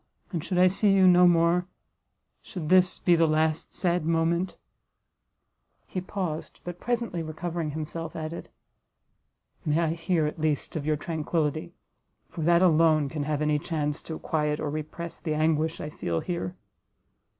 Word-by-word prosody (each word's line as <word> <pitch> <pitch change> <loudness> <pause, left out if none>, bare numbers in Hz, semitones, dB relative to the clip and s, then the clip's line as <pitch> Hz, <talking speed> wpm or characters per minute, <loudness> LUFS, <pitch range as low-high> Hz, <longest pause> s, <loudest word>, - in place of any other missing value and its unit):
And 165 -5 -3
should 185 0 -2
I 180 - +6
see 195 +3 +3
you 190 -1 +5
no 180 0 +7
more, 175 +1 +3 0.7
should 170 -7 -6
this 185 0 +4
be 175 - +3
the 165 -1 +4
last 155 0 0
sad 175 -2 0
moment 165 +3 0 0.7
" - - -49
He 185 - -1
paused, 180 -4 -4
but 175 0 -7
presently 235 -8 -2
recovering 165 +1 -4
himself, 160 +2 -5
added, 160 +1 -6 1.1
"May 150 0 +1
I 170 -1 +2
hear, 165 0 0
at 150 - -4
least, 155 -3 -1
of 155 -2 -3
your 155 -1 +2
tranquillity, 160 +1 -2 0.6
for 165 - -6
that 170 +3 +4
alone 160 -4 +4
can 150 -1 -3
have 150 0 -1
any 150 -1 +2
chance 150 -2 -2
to 160 - -3
quiet 150 -1 -1
or 145 - -2
repress 155 +2 -6
the 155 -3 -2
anguish 160 +1 +1
I 150 - -5
feel 85 - -2
here!" 175 0 -4
165 Hz, 160 wpm, -27 LUFS, 155-175 Hz, 1.1 s, no